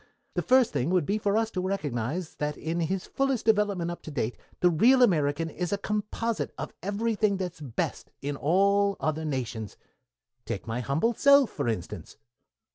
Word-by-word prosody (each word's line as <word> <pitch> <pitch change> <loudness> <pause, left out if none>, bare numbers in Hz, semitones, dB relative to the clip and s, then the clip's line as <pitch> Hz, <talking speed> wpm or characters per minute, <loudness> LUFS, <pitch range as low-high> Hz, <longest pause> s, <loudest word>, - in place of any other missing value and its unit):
The - - 0
first 255 -1 +4
thing 140 +1 0
would 180 -4 +2
be 205 +6 0
for 205 0 +1
us 225 0 0
to 185 - -2
recognize 155 - -2
that 150 0 -2
in 165 +2 -3
his 180 +3 -1
fullest 270 -4 -1
development 205 -6 +2
up 175 - -7
to - - -9
date 125 -5 -2 0.2
the 180 - +4
real 250 +10 +5
American 155 -6 +2
is 175 +2 -4
a 200 - +1
composite 210 +2 -2
of - - -5
everything 210 0 0
that 180 -2 -3
is - - -18
best 130 -6 -3
in 145 +1 -3
all 200 +6 +2
other 155 0 -1
nations. 120 - -4 0.7
Take - - -5
my 115 +2 -3
humble 140 - +1
self 280 -1 +5
for 140 -4 -3
instance." 110 -7 -4
180 Hz, 180 wpm, -27 LUFS, 150-210 Hz, 0.7 s, real